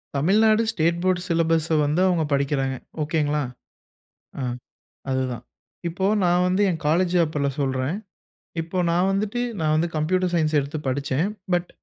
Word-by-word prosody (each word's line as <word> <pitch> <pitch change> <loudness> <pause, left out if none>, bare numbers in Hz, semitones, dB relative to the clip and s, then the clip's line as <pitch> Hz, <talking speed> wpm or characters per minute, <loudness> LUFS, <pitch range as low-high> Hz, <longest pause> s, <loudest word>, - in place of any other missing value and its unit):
Tamil Nadu 215 +9 +4
state 170 -3 +1
board 185 -1 +2
சிலபஸ்ச 165 -1 +2
வந்து 155 +5 +1
அவங்க 170 -3 +2
படிக்கிறாங்க. 140 -1 0 0.3
ஒகேங்களா? 150 -1 0 1.0
ஆ, - - -2 0.7
அதுதான். 130 -2 -2 0.4
இப்ப 190 +3 -1 0.2
நான் 175 +1 +3
வந்து 190 +3 +2
என் 160 - -3
காலேஜ் 175 +3 +2
அப்பில்ல 150 -2 -1
சொல்றேன். 135 +4 -1 0.7
இப்ப 180 +3 -2
நான் 180 +3 +2
வந்துட்டு 210 +4 -1 0.2
நான் 155 -1 +1
வந்து 165 +2 +2
கம்ப்யூட்டர் 180 +3 +1
சயன்ஸ் 155 -2 +1
எடுத்து 140 +3 -4
படிச்சேன். 140 +5 0 0.3
பட் 175 0 0
165 Hz, 135 wpm, -24 LUFS, 145-180 Hz, 1.0 s, Tamil Nadu